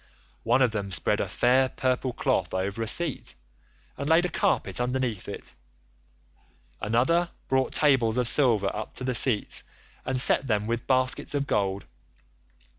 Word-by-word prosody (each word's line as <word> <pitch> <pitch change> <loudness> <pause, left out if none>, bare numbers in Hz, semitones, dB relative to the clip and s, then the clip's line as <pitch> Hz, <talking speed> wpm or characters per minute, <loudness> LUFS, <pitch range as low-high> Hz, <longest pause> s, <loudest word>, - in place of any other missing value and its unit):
One 125 +3 +2
of 125 - +2
them 100 -3 -4
spread 90 - +1
a - - -2
fair 130 +2 +2
purple 130 0 -1
cloth - - -1
over 100 +4 -3
a 115 - -2
seat, 165 +2 -2 0.6
and 140 +2 -4
laid 165 +2 +4
a - - -1
carpet 140 - 0
underneath 125 -5 -2
it. 100 - -8 1.3
Another 130 - +1 0.2
brought 130 -1 0
tables 130 -6 +2
of 125 -2 +2
silver 115 -8 +4
up 110 0 -7
to - - -5
the 130 0 -1
seats, 115 -3 +1 0.4
and 130 -1 -1
set 135 +1 +4
them 105 -3 0
with 115 +1 -3
baskets 130 +2 0
of 140 -1 -1
gold. 100 -5 -1
125 Hz, 155 wpm, -26 LUFS, 110-130 Hz, 1.3 s, laid